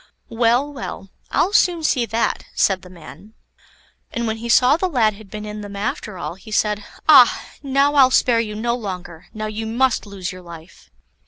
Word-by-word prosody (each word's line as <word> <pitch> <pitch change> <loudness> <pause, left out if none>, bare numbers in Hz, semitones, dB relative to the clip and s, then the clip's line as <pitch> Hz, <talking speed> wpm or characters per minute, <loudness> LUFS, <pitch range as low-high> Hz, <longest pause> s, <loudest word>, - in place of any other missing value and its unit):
"Well, 240 +5 +1
well; 195 -7 -7 0.2
I'll 390 - +1
soon 350 -5 +3
see 250 -6 +1
that," 230 +1 -1
said 190 -2 +2
the 185 - -14
man; 185 +5 -14 0.8
and 235 0 -3
when 220 0 -2
he 235 +1 -7
saw 250 +3 +5
the 370 +3 -1
lad 230 -8 +2
had 205 0 -14
been 210 +2 -7
in 210 0 -7
them 205 -1 -8
after 205 -1 -4
all, - - -5
he 195 +5 -15
said: 210 -1 0 0.2
"Ah! 270 -6 +6 0.2
now 275 +1 +2
I'll 270 -3 +6
spare 245 -2 +3
you 215 -2 -3
no 235 +2 -1
longer; 180 -6 -7
now 215 0 -5
you 215 +1 -4
must 240 0 0
lose 195 -3 -5
your 185 0 -10
life." 170 - -13
220 Hz, 190 wpm, -20 LUFS, 200-250 Hz, 0.8 s, Ah